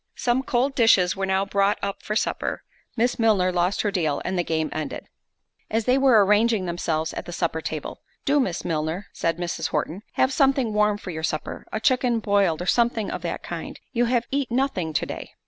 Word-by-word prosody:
Some 245 +1 +1
cold 260 +1 0
dishes 225 -8 +4
were 195 0 -2
now 190 +1 +1
brought 200 0 +2
up 200 0 -3
for 210 - -3
supper—Miss 240 +2 -2
Milner 205 -5 +3
lost 180 +2 +1
her 205 - 0
deal, 155 -7 0
and 190 - -1
the 175 - +1
game 160 -1 -1
ended. 155 -3 -4 0.6
As 220 0 0
they 250 - +4
were 245 -7 +6
arranging 210 0 +3
themselves 165 -2 -2
at - - -6
the - - -6
supper 170 -2 -1
table, 155 -2 -5 0.2
"Do, 290 +1 +3
Miss 190 -11 -1
Milner," 160 +4 -2
said 165 0 -1
Mrs. 175 -1 -2
Horton, 155 +5 -2
"have 260 +1 +2
something 265 -5 +2
warm 210 0 +2
for 195 -3 -7
your 160 -1 -5
supper; 155 -1 -4
a 220 - -2
chicken 250 -1 +2
boiled, 200 -6 +1
or - - -6
something 230 -1 +1
of - - -4
that - - -4
kind; - - -6
you 240 -1 +2
have 240 0 +1
eat 275 -2 0
nothing 240 -10 0
to 150 - 0
day." - - -7
200 Hz, 200 wpm, -24 LUFS, 175-240 Hz, 0.6 s, were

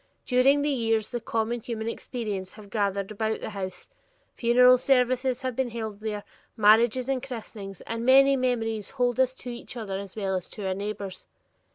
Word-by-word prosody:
During 270 +3 +4
the 295 - +1
years, 225 -4 0
the 240 - -2
common 230 +1 -1
human 225 -1 -5
experiences 210 -6 -4
have 205 -2 -13
gathered 200 -2 -1
about 220 +1 -1
the - - -5
House; 190 -2 -6 0.5
funeral 250 +1 +5
services 255 0 +2
have 255 -2 -2
been 260 -1 0
held 220 -3 -5
there, 210 -1 -4 0.3
marriages 225 +4 +5
and 270 -2 0
christenings, 215 -6 -8
and 230 0 -4
many 275 +2 +6
memories 225 -5 -1
hold 245 0 +1
us 260 0 +3
to 250 - -7
each 240 +1 -8
other 195 -4 -4
as 195 -2 -8
well 195 -3 -1
as 185 - -4
to 205 - -7
our 190 - 0
neighbors. 200 -1 -5
230 Hz, 180 wpm, -27 LUFS, 205-250 Hz, 0.5 s, many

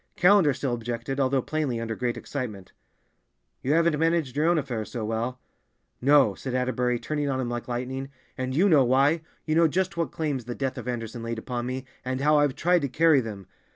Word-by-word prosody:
Callender 180 -4 +5
still 130 -1 -2
objected, 120 +3 -4
although 135 -1 +2
plainly 150 -7 -1
under 115 -1 -3
great 120 0 -2
excitement. 110 -10 -6 0.9
"You 140 - +1
haven't 165 -2 +3
managed 165 -5 +1
your 150 +3 +2
own 170 0 +4
affairs 125 -7 -3
so 115 -3 -3
well." 115 +3 -2 0.6
"No," 140 -5 +5
said 130 +6 -5
Atterbury, 125 -1 0
turning 145 +3 -2
on 130 -1 -1
him 125 -2 -2
like 120 -1 -4
lightning, 130 +2 -4 0.3
"and 130 0 -3
you 185 +7 +4
know 150 -8 +6
why. 135 +6 +3 0.2
You 155 - 0
know 165 +1 +5
just 185 +3 -1
what 165 -6 -1
claims 145 -7 -2
the 120 0 -5
death 135 -2 -3
of 125 - -8
Anderson 120 -1 -4
laid 115 0 -4
upon 120 +1 -4
me, 130 +1 -4 0.2
and 130 0 -2
how 150 +2 +4
I've 145 -2 +2
tried 175 +3 +2
to 140 - -1
carry 160 0 +4
them. 105 -4 -7
130 Hz, 205 wpm, -26 LUFS, 120-150 Hz, 0.9 s, know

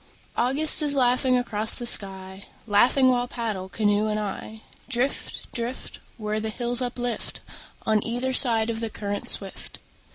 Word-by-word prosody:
August 290 +6 +6
is 290 -1 +2
laughing 255 0 +2
across 220 -3 -2
the 240 - -5
sky, 190 -3 -5 0.2
Laughing 240 +5 +3
while 245 -1 0
paddle, 215 -6 -5
canoe 205 +1 0
and 215 0 -2
I, 215 +2 -7 0.3
Drift, 260 +2 -3
drift, 240 +2 -6 0.2
Where 215 -1 -3
the 220 0 -4
hills 240 +2 -2
uplift 245 -1 -5 0.4
On 215 -1 +1
either 245 +3 -3
side 230 -3 +6
of 225 - -5
the 225 -1 -3
current 205 -1 -3
swift. 195 -1 0
230 Hz, 150 wpm, -24 LUFS, 210-250 Hz, 0.4 s, August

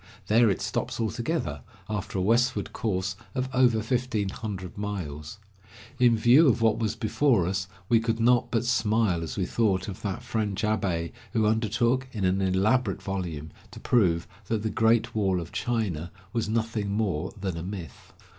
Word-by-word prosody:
There 115 +1 +5
it 95 - -1
stops - - -2
altogether, 115 - -2 0.3
after 105 -2 -3
a 95 - +1
westward 115 +1 +1
course 95 -3 -1 0.2
of 130 0 0
over 120 -4 +3
fifteen 120 -4 -1
hundred 95 -4 -6
miles. 90 -5 -5 0.6
In 120 -2 +5
view 125 +8 +6
of 125 - +3
what 110 -1 +2
was 110 -1 -1
before 115 - +2
us, 95 +1 -2 0.2
we 115 +1 +4
could 115 0 -1
not 120 +1 +3
but 115 0 0
smile 110 -6 +2
as 80 - -5
we 95 - 0
thought 100 -3 +1
of 100 - -7
that 100 +2 -3
French 110 -5 -2
abbe 95 -7 0 0.2
who 110 -1 +2
undertook, 115 +4 +1
in 105 -4 -1
an 95 +1 +2
elaborate 95 +4 +1
volume, 85 -6 -4 0.2
to - - -11
prove 90 -9 +2 0.2
that 110 -1 -1
the 110 - -1
"Great 115 +1 +2
Wall 95 -4 +1
of 85 -1 -7
China" 100 -9 -2 0.2
was 115 -2 -1
nothing 110 -2 -1
more 100 -6 -1
than 95 -3 -3
a 85 - -4
myth. 90 -2 -8
105 Hz, 170 wpm, -27 LUFS, 95-115 Hz, 0.6 s, view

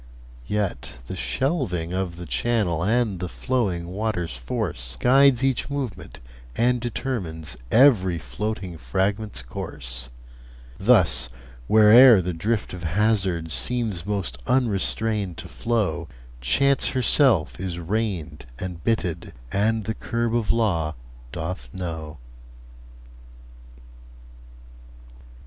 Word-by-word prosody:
Yet 100 -11 -2
the 95 - -6
shelving 95 - -1
of 95 -2 -2
the 90 0 -8
channel 100 -5 0
And 110 -2 +1
the 90 0 -4
flowing 95 -10 -1
water's 95 - -2
force - - -3
Guides 135 0 +5
each 130 -2 0
movement, 120 - -5 0.4
and 125 +1 +2
determines 95 - -4 0.2
Every 110 -9 +5
floating 95 -1 -5
fragment's 95 - -2
course. 60 0 -5 0.7
Thus, 60 +1 +3 0.4
where'er 110 +2 +8
the 90 0 -2
drift 105 +7 -2
of 90 - -7
hazard 95 -2 +1
Seems 115 -4 -1
most 95 -11 -3
unrestrained 110 -5 +1
to - - -8
flow, 105 -8 -1 0.3
Chance 140 - +3
herself 120 - +3
is 90 -2 -4
reined 85 - -3
and 90 -2 -6
bitted, 90 -7 -1 0.2
And 110 +2 +1
the 110 - -2
curb 115 +1 -2
of 115 -3 +1
law 85 -9 0 0.4
doth 85 +5 -5
know. 80 -4 -5
95 Hz, 105 wpm, -24 LUFS, 85-115 Hz, 0.7 s, where'er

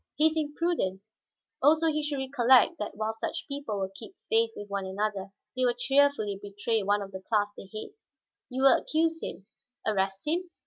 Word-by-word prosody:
He 305 - +3
is 315 - +4
imprudent. 295 - -1 0.6
Also 310 +4 +5
he 305 -1 +2
should 295 -1 -2
recollect 265 +3 +4
that 210 - -4
while 220 +1 -1
such 330 +9 -4
people 280 -7 -4
will 190 -1 -2
keep 195 - -11
faith 455 0 +4
with 205 - -7
one 200 -1 -3
another, 200 0 -2 0.3
they 255 - 0
will 245 -1 +3
cheerfully 270 -6 +2
betray 205 +2 -1
one 205 +1 +1
of 195 - -9
the 190 -1 -7
class 205 0 +1
they 190 - -11
hate." 215 - -7 0.6
"You 260 +1 -2
will 270 -2 +8
accuse 325 +1 0
him, 195 - -6 0.4
arrest 195 -2 0
him?" 345 +4 -1
245 Hz, 185 wpm, -28 LUFS, 205-300 Hz, 0.6 s, will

